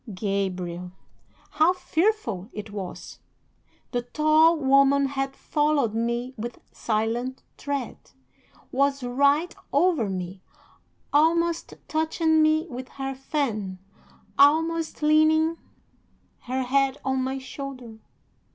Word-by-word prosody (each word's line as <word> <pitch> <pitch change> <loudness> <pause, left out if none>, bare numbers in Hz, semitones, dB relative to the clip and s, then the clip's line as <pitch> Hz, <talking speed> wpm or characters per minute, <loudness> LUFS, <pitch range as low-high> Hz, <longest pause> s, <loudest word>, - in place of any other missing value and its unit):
Gabriel! 185 -3 -3 0.6
how 320 +3 +4
fearful 330 - -1
it 210 0 -7
was! 195 -3 -7 0.7
The 245 - 0
tall 310 +6 +4
woman 275 0 +4
had 270 0 -3
followed 295 -7 +1
me 235 +3 -2
with 235 +2 -6
silent 235 +4 -2
tread, 280 -3 -4 0.7
was 275 0 +1
right 280 +7 +2 0.2
over 330 - +2
me, 185 0 -5 0.7
almost 335 +3 +2
touching 315 0 +2
me 310 +1 +3
with 255 -3 -7
her 270 0 -3
fan, 255 -9 -3 0.6
almost 320 +2 +3
leaning 315 +2 +4 0.9
her 260 +1 -1
head 270 +1 +1
on 265 -1 0
my 265 +1 -2
shoulder. 260 -3 -8
270 Hz, 100 wpm, -25 LUFS, 235-310 Hz, 0.9 s, how